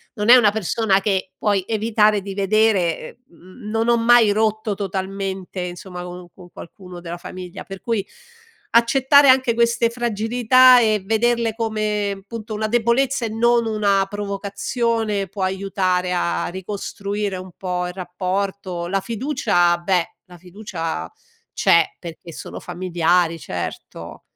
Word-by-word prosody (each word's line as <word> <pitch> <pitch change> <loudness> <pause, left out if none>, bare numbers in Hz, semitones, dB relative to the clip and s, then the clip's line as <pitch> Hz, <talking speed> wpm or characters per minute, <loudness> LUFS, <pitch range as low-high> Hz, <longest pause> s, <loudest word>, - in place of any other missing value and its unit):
non 210 0 -1
è 245 - +11
una 220 -5 +5
persona 210 -1 +1
che 190 -2 -1
puoi 205 -3 0
evitare 215 -2 +2
di 195 0 -7
vedere, 200 -1 +1
ehm, 185 +6 -13
non 225 +1 0
ho 235 - +5
mai 230 -2 +5
rotto 215 0 0
totalmente 195 -1 -4
insomma 180 0 -7
con 180 0 -8
un 180 - -13
con 175 -1 -15
qualcuno 180 +1 -11
della 175 0 -6
famiglia 180 0 -9
per 195 -1 -10
cui, 225 -5 -2 0.7
accettare 265 +4 +5
anche 260 -3 +4
queste 235 0 +2
fragilità 240 +2 +4
e 215 -2 +2
vederle 225 +1 +1
come, 210 -3 -2
punto 220 -1 -7
una 215 +1 -1
debolezza 240 +3 +1
e - - -3
non 235 +2 +2
una 200 -3 +1
provocazione, 205 +1 -2
può 195 +1 -7
aiutare 185 -1 -1
a 175 -1 -1
ricostruire 200 +1 -4
un 185 0 -9
po' 180 -1 -3
il 180 - -7
rapporto, 185 0 -4
la 195 +2 0
fiducia, 220 -6 +1
beh 175 -1 -1
la 180 -1 -15
fiducia 180 -2 -6 0.4
c'è 170 -1 +4 0.2
perché 170 0 -10
sono - - -8
familiari 175 -1 0
certo. 90 - -7
200 Hz, 140 wpm, -21 LUFS, 185-225 Hz, 0.7 s, è